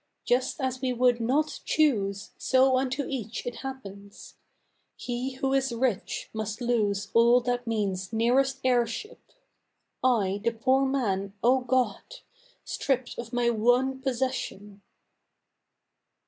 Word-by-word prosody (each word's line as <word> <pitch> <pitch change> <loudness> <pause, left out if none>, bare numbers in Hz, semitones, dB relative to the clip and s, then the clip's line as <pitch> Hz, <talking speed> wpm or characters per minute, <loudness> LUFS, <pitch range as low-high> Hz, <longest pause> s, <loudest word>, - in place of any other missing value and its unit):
Just 255 +4 +1
as 260 -2 -2
we 255 -1 0
would 245 0 +3
not 285 +7 0
choose, 200 -11 +1
so 260 0 +3
unto 270 +1 -2
each 235 -5 -5
it 245 -1 -4
happens! 200 -7 -9 0.6
He 250 +2 -4
who 270 0 -1
is 270 -1 +1
rich 235 -3 -1
must 215 -1 -4
lose 215 -5 0
all 235 +2 +6
that 245 0 -2
means 195 -4 -2
nearest 265 +4 +2
heirship, 245 - 0 0.8
I, 205 -6 +2
the 235 0 +1
poor 260 +4 +2
man, 200 -8 -1
O 255 +3 +5
God! 255 - -1 0.5
stripped 260 -3 -2
of 235 -1 -6
my 240 -1 +2
one 245 +4 +2
possession! 245 -6 -3
245 Hz, 120 wpm, -27 LUFS, 220-265 Hz, 0.8 s, all